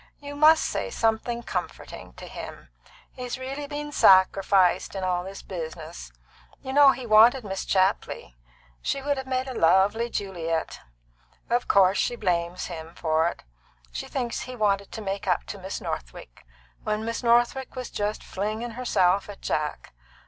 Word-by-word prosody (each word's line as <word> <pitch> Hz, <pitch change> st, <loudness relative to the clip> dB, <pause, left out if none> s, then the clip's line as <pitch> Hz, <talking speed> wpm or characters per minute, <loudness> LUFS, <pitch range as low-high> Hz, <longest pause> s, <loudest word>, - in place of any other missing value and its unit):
You 285 Hz, 0 st, -8 dB
must 310 Hz, +2 st, +6 dB
say -, -, -2 dB
something 235 Hz, -, -1 dB
comforting -, -, -6 dB
to -, -, -11 dB
him. -, -, -9 dB, 0.4 s
He's 250 Hz, 0 st, -5 dB
really 270 Hz, +3 st, -5 dB
been 295 Hz, 0 st, -5 dB
sacrificed 190 Hz, -4 st, +4 dB
in 190 Hz, -, -3 dB, 0.2 s
this 195 Hz, +1 st, -8 dB
business. 165 Hz, -2 st, -7 dB, 0.5 s
You 265 Hz, -1 st, -5 dB
know 285 Hz, 0 st, +8 dB
he 260 Hz, -2 st, -1 dB
wanted 230 Hz, +4 st, +6 dB
Miss 195 Hz, -2 st, -4 dB
Chapley. 190 Hz, -, 0 dB, 0.5 s
She 275 Hz, -, -1 dB
would 285 Hz, +1 st, -1 dB
have 265 Hz, 0 st, -5 dB
made 260 Hz, 0 st, -1 dB
a 260 Hz, -, -5 dB
lovely 200 Hz, +5 st, +3 dB
Juliet. 165 Hz, -7 st, -3 dB, 0.7 s
Of 240 Hz, +1 st, +1 dB
course 195 Hz, 0 st, +4 dB
she 240 Hz, -, 0 dB
blames 175 Hz, -4 st, -1 dB
him 165 Hz, -1 st, -8 dB
for 160 Hz, 0 st, +1 dB
it. -, -, -5 dB, 0.5 s
She -, -, -5 dB
thinks 245 Hz, -3 st, -3 dB
he 255 Hz, -, -7 dB
wanted 200 Hz, -3 st, 0 dB
to 220 Hz, -, -6 dB
make 195 Hz, 0 st, -4 dB
up 180 Hz, -, +1 dB
to 200 Hz, -, -8 dB
Miss 190 Hz, +1 st, -5 dB
Northwick, -, -, -7 dB, 0.4 s
when 215 Hz, +1 st, -2 dB
Miss 230 Hz, 0 st, -3 dB
Northwick 240 Hz, +3 st, +2 dB
was 255 Hz, -1 st, -6 dB
just 210 Hz, +1 st, -2 dB
flinging 215 Hz, +4 st, -4 dB
herself 200 Hz, -6 st, +1 dB
at 205 Hz, -, -10 dB
Jack. 150 Hz, -1 st, -3 dB
210 Hz, 155 wpm, -26 LUFS, 185-250 Hz, 0.7 s, know